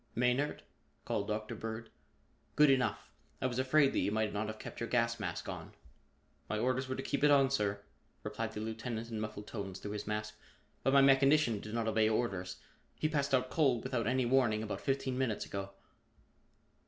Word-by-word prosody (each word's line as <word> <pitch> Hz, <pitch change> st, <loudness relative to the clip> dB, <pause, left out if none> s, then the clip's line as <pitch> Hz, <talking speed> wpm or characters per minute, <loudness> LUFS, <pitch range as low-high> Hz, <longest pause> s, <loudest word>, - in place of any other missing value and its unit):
"Maynard?" 125 Hz, +5 st, +1 dB, 0.4 s
called 100 Hz, -1 st, -1 dB
Dr. 110 Hz, 0 st, -3 dB
Bird. 110 Hz, 0 st, -6 dB, 0.6 s
"Good 150 Hz, -1 st, +6 dB
enough! 130 Hz, -2 st, 0 dB, 0.3 s
I -, -, -2 dB
was 125 Hz, 0 st, -1 dB
afraid 135 Hz, +2 st, +4 dB
that -, -, +1 dB
you -, -, +1 dB
might 110 Hz, 0 st, 0 dB
not 105 Hz, +1 st, -1 dB
have 110 Hz, 0 st, -5 dB
kept -, -, -8 dB
your 115 Hz, -, -3 dB
gas 115 Hz, -1 st, +1 dB
mask 90 Hz, -5 st, -4 dB
on." -, -, -7 dB, 0.8 s
"My 110 Hz, -, -1 dB
orders 130 Hz, +3 st, 0 dB
were 130 Hz, -, -1 dB
to 135 Hz, -, -4 dB
keep 140 Hz, -, -2 dB
it 150 Hz, -, +7 dB
on, 135 Hz, -2 st, +5 dB
sir," 100 Hz, -6 st, 0 dB, 0.4 s
replied 115 Hz, -1 st, -3 dB
the 105 Hz, -, -4 dB
lieutenant 115 Hz, +1 st, -4 dB
in 110 Hz, -, -3 dB
muffled 105 Hz, -1 st, -5 dB
tones 100 Hz, -4 st, -5 dB
through 105 Hz, -, -6 dB
his 105 Hz, -1 st, -5 dB
mask, 105 Hz, 0 st, -3 dB, 0.4 s
"but 135 Hz, -, +2 dB
my 140 Hz, -, +7 dB
mechanician 135 Hz, -3 st, +5 dB
did 110 Hz, +2 st, -6 dB
not 115 Hz, -1 st, 0 dB
obey 110 Hz, 0 st, +3 dB
orders. 100 Hz, -5 st, -1 dB, 0.4 s
He 155 Hz, -, 0 dB
passed 140 Hz, -3 st, +1 dB
out 130 Hz, 0 st, 0 dB
cold 135 Hz, -7 st, +2 dB
without 120 Hz, -3 st, -1 dB
any 130 Hz, +1 st, +2 dB
warning 120 Hz, -4 st, +3 dB
about 105 Hz, -, -4 dB
fifteen 135 Hz, -1 st, -1 dB
minutes 120 Hz, -5 st, 0 dB
ago." 100 Hz, 0 st, -5 dB
115 Hz, 190 wpm, -33 LUFS, 110-130 Hz, 0.8 s, it